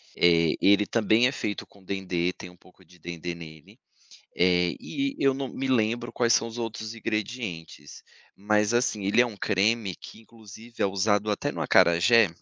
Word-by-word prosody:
Eh, 85 Hz, -2 st, +3 dB
ele 100 Hz, +1 st, +4 dB
também 115 Hz, +2 st, +2 dB
é 130 Hz, -, -1 dB
feito 105 Hz, -7 st, -4 dB
com 100 Hz, -1 st, -22 dB
dendê, 90 Hz, -2 st, -2 dB
tem 90 Hz, -, -11 dB
um 90 Hz, -, -18 dB
pouco 90 Hz, +1 st, -22 dB
de 90 Hz, +1 st, -21 dB
dendê 85 Hz, +1 st, -6 dB
nele. 80 Hz, -3 st, -13 dB, 0.6 s
Eh, 90 Hz, -1 st, +2 dB
e 275 Hz, 0 st, -3 dB
eu 135 Hz, -1 st, +2 dB
não 135 Hz, -1 st, -4 dB
me 135 Hz, +2 st, -4 dB
lembro 120 Hz, -1 st, 0 dB
quais 120 Hz, -1 st, +2 dB
são 115 Hz, -, +2 dB
os 115 Hz, +1 st, -9 dB
outros 115 Hz, -1 st, -5 dB
ingredientes, 110 Hz, -, -5 dB, 0.3 s
mas, 105 Hz, +2 st, +1 dB
assim, 115 Hz, -4 st, 0 dB
ele 100 Hz, +5 st, +3 dB
é 125 Hz, -, +5 dB
um 110 Hz, -4 st, -9 dB
creme 100 Hz, 0 st, 0 dB
que -, -, -13 dB
inclusive 115 Hz, +1 st, -10 dB
é -, -, +4 dB
usado 100 Hz, +2 st, 0 dB
até 105 Hz, -, -1 dB
no -, -, -7 dB
acarajé. 105 Hz, +6 st, +4 dB
105 Hz, 180 wpm, -26 LUFS, 90-115 Hz, 0.6 s, é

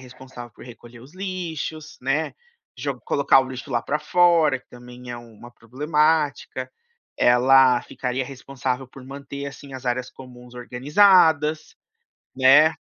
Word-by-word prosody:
responsável 130 Hz, -1 st, -12 dB
por -, -, -14 dB
recolher 120 Hz, 0 st, -14 dB
os 135 Hz, +8 st, -16 dB
lixos, 165 Hz, -5 st, -6 dB
né, 135 Hz, +5 st, -1 dB, 0.4 s
jo 130 Hz, 0 st, -4 dB
colocar 140 Hz, -1 st, +4 dB
o 130 Hz, -, -5 dB
lixo 130 Hz, +2 st, -8 dB
lá 120 Hz, -2 st, 0 dB
para 150 Hz, -, -2 dB
fora, 165 Hz, -3 st, +3 dB
que -, -, -36 dB
também 125 Hz, 0 st, -12 dB
é 120 Hz, -, -5 dB
uma 120 Hz, 0 st, -13 dB
problemática. 145 Hz, +2 st, -1 dB, 0.5 s
Ela 125 Hz, 0 st, +5 dB
ficaria 125 Hz, 0 st, -4 dB
responsável 130 Hz, -1 st, -5 dB
por 130 Hz, 0 st, -14 dB
manter, 140 Hz, +1 st, -8 dB
assim, 140 Hz, 0 st, -10 dB
as 130 Hz, 0 st, -9 dB
áreas 125 Hz, +1 st, -2 dB
comuns 125 Hz, -1 st, -14 dB
organizadas, 150 Hz, +4 st, +3 dB, 0.6 s
né. 135 Hz, +5 st, +6 dB
135 Hz, 135 wpm, -23 LUFS, 125-150 Hz, 0.6 s, né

